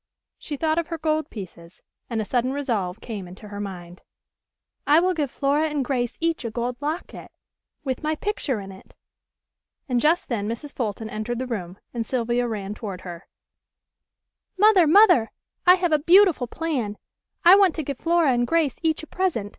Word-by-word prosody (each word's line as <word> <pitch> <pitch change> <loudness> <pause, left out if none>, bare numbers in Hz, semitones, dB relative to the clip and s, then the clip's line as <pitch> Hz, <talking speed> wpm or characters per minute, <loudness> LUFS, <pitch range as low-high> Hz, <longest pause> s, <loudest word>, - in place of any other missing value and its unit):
She 295 - -6
thought 315 +2 +1
of 335 - -3
her 330 - -4
gold 310 -1 -1
pieces, 175 -4 -10 0.3
and 230 -2 -2
a 215 - -1
sudden 250 +3 0
resolve 220 -10 -2
came 205 -6 -6
into 195 +4 -12
her 205 0 -7
mind: 180 -3 -7 0.9
"I 295 +3 +6
will 365 +2 +2
give 300 -5 -1
Flora 290 +4 +1
and 290 -3 -2
Grace 245 -3 -2
each 330 -3 -1
a 230 - -3
gold 240 +2 -3
locket, 310 +5 -5 0.5
with 260 -3 -3
my 310 0 -1
picture 305 - -2
in 195 -1 -8
it." 190 - -16 0.9
And 250 -3 +1
just 320 +6 +2
then 210 -4 -2
Mrs. 255 +6 -6
Fulton 220 -2 -3
entered 215 +3 -4
the 260 - -3
room, 190 -7 -5 0.2
and 235 -2 -2
Sylvia 240 0 -1
ran 205 -3 -4
toward 200 -4 -7
her: 175 -2 -9 1.3
"Mother! 400 -4 +6
Mother! 315 - +6 0.4
I 360 - +9
have 355 -2 -1
a 305 - +4
beautiful 345 -4 +5
plan. 250 -8 -3 0.5
I 355 +2 +10
want 390 -4 +4
to 315 - -3
give 275 -2 -5
Flora 335 -4 +3
and 240 -1 +1
Grace 325 -3 +1
each 320 -1 0
a - - -6
present. 325 - -1
255 Hz, 180 wpm, -24 LUFS, 215-320 Hz, 1.3 s, I